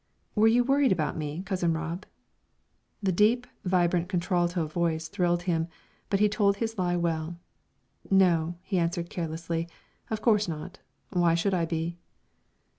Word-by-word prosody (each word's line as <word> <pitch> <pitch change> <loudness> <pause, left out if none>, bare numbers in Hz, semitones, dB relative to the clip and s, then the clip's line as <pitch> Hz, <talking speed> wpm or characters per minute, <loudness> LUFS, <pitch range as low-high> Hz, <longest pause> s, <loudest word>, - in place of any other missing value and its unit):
"Were 215 0 +4
you 240 +2 +5
worried 275 +1 +3
about 160 -5 0
me, 155 +3 -4
Cousin 180 -3 0
Rob?" 165 +4 -4 1.0
The 190 - +2
deep, 220 +7 +3 0.2
vibrant 175 -1 +2
contralto 175 -2 0
voice 160 0 -1
thrilled 175 -2 0
him, 165 -2 0 0.4
but 195 - +1
he 210 - +5
told 200 -1 +2
his 225 -2 -3
lie 175 -1 +1
well. 165 -1 -1 0.7
"No," 175 -4 +3
he 190 -1 0
answered, 170 0 -1
carelessly, 165 0 -3 0.4
"of 220 - -2
course 215 -3 +3
not. 170 +3 -6 0.3
Why 175 -3 +3
should 180 +4 +1
I 175 -2 +2
be?" 165 +1 -3
175 Hz, 145 wpm, -28 LUFS, 165-195 Hz, 1.0 s, you